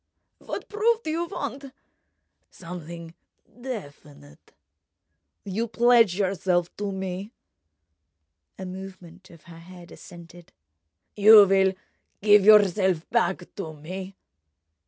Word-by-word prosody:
"What - - -7
proof 450 +2 0
do 310 - -3
you 335 +2 -2
want?" 280 - -6 0.8
"Something 170 -1 -10 0.5
definite.... 145 - -10 0.9
You 210 +4 -3
pledge 230 -3 +3
yourself 185 -3 -1
to 205 -1 -4
me?" 190 +3 -6 1.2
A 190 - -7
movement 185 -1 -11
of 170 -3 -17
her 165 -1 -14
head 175 0 -14
assented. 175 -1 -14 0.6
"You 210 0 +8
will 190 0 +2 0.5
give 205 -1 +5
yourself 190 -5 +4
back 175 0 -1
to 160 -6 -7
me?" 185 +5 -9
190 Hz, 100 wpm, -24 LUFS, 175-210 Hz, 1.2 s, You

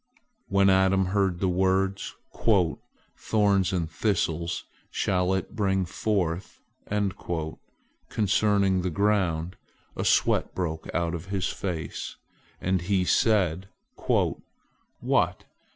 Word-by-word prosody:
" - - -49
When 100 0 +3
Adam 95 0 +4
heard 95 -4 +1
the 95 - +1
words, 95 +1 +1 0.2
"Thorns 100 +1 0
and 90 -3 -1
thistles 85 -2 -1 0.2
shall 90 0 0
it 95 - -4
bring 95 -3 +1
forth," 90 -1 -2 1.5
concerning 100 -2 +2
the 90 - -1
ground, 90 -3 0 0.4
a - - -2
sweat - - +2
broke 80 -3 -3
out 85 -1 0
on 85 - -2
his 95 +1 -2
face, 85 -6 -4 0.4
and 95 -1 0
he 95 0 +1
said: 95 -6 +2 0.4
"What! - - -1
95 Hz, 105 wpm, -27 LUFS, 90-100 Hz, 1.5 s, Adam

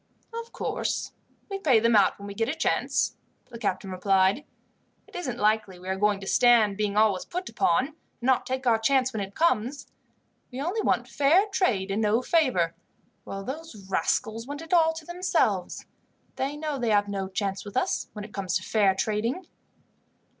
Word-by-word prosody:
"Of 465 0 -6
course, - - -2 0.4
we 395 -1 -4
pay 265 - +4
them 230 +1 +3
out 200 -2 +4
when 200 - -10
we 200 - -6
get 225 +4 -1
a 305 - -1
chance," 320 - 0 0.3
the 230 - -8
captain 190 -3 -2
replied. 190 +5 +2 0.6
"It - - -18
isn't 260 -10 -3
likely 210 -3 +1
we 180 +1 -12
are 190 - 0
going 205 0 +1
to - - -7
stand 230 -2 +4
being 210 0 -1
always 210 -4 +3
put 360 +1 -5
upon, 275 -8 +2
and 310 - -21 0.2
not 255 +1 +1
take 260 +1 -3
our 230 -2 +4
chance 260 +2 +2
when 215 - -2
it 195 0 -6
comes. 280 -4 +1 0.7
We 250 - -6
only 355 +10 -1
want - - +1
fair 310 +8 +4
trade 205 - +1
and 205 +3 0
no 220 +3 +2
favour, 250 - +2 0.5
while 195 0 -6
those 260 -6 -8
rascals 220 +7 0
want 290 +2 -6
it 325 - -6
all 325 -2 +5
to 320 -1 -9
themselves. 360 +2 0 0.5
They 275 +2 -2
know 300 -2 -3
they 240 -2 0
have 205 -1 +3
no 195 -1 -3
chance 195 0 -2
with 205 - -6
us - - 0
when 210 -1 -6
it 210 - -14
comes 190 -4 -1
to 185 - -9
fair 200 -3 +2
trading." 220 - -1
225 Hz, 190 wpm, -26 LUFS, 200-285 Hz, 0.7 s, all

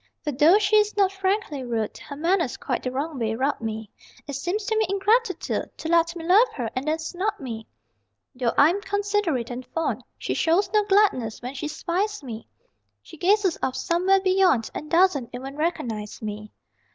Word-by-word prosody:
For, 300 - -1
though 300 +8 +5
she 425 0 +3
is 420 0 +2
not 390 -2 +4
frankly 385 -7 -1
rude, 230 -3 -2
Her 285 - -9
manners 335 -1 0
quite - - -2
the 255 - -2
wrong 280 +2 -3
way 220 -1 -1
rub 270 +3 -1
me: 220 -2 -5 0.3
It 285 - -6
seems 355 +10 -2
to 440 - 0
me 435 0 +2
ingratitude 400 +2 0
To - - -5
let 335 0 +3
me 330 -1 -6
love 405 +8 +6
her 235 -5 -3
and 260 +3 -3
then 310 +1 +1
snub 370 +6 -3
me! 225 -5 -6 0.7
Though 245 -2 -1
I'm 340 +8 +5
considerate 405 - -1
and 245 +1 -5
fond, 325 +5 -3
She - - -3
shows 340 +5 +2
no 425 -1 +4
gladness 385 - +2
when 250 +2 -5
she 280 +2 -4
spies 360 +5 -2
me 230 -4 -7 0.6
She 330 - -13
gazes 380 +1 +2
off 260 - -1
somewhere 355 +8 +2
beyond 370 - +3
And 305 - -6
doesn't 335 -8 +3
even 265 +3 -6
recognize 235 -10 -3
me. 210 -1 -6
325 Hz, 185 wpm, -24 LUFS, 255-390 Hz, 0.7 s, love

